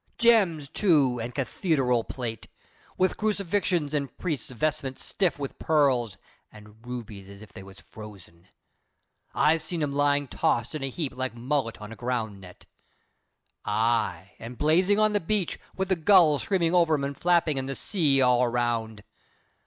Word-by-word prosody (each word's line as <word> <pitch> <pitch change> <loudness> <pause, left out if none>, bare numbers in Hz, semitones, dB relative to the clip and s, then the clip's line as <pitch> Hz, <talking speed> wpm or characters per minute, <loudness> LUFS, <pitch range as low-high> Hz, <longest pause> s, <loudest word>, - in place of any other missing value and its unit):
Gems, 200 -11 +3
too, 140 - +2
and 120 +1 -5
cath 135 - -5
e 170 -4 +3
deral 125 -4 +1
plate, 115 -4 -5 0.5
with 185 0 +1
crucifixions 195 -7 -1
and 140 -3 -3
priests' 155 -9 -3
vestments 135 +1 -3
stiff 180 -8 0
with 140 -2 -6
pearls 130 - +1 0.3
and 105 +2 -16
rubies 110 -6 -7
as 100 +1 -12
if 110 - -16
they 100 - -10
was 95 0 -14
frozen. 95 -5 -13 0.9
I've 160 +1 +3
seen 160 0 -3
'em 145 - -1
lyin' 145 0 +1
tossed 120 0 -1
in 155 - -4
a 135 - -2
heap 135 -1 -5
like 130 -2 -3
mullet 125 -1 -2
in 105 +1 -9
a - - -8
ground 115 -5 -3
net. 90 -1 -14 1.0
Ay, 110 -2 0
and 120 +2 -9
blazin' 180 +7 +3
on 215 0 +3
the 205 - +2
beach, 195 0 -2 0.2
with 190 0 -2
the 190 - +3
gulls 165 -4 +5
screamin' 175 -4 0
over 170 -3 +4
'em 140 - -3
and 140 0 -3
flappin', 170 -3 +2
and 130 0 -5
the 135 - -3
sea 145 -8 +1
all 125 0 +4
around. 115 -3 -1
135 Hz, 170 wpm, -26 LUFS, 115-165 Hz, 1.0 s, gulls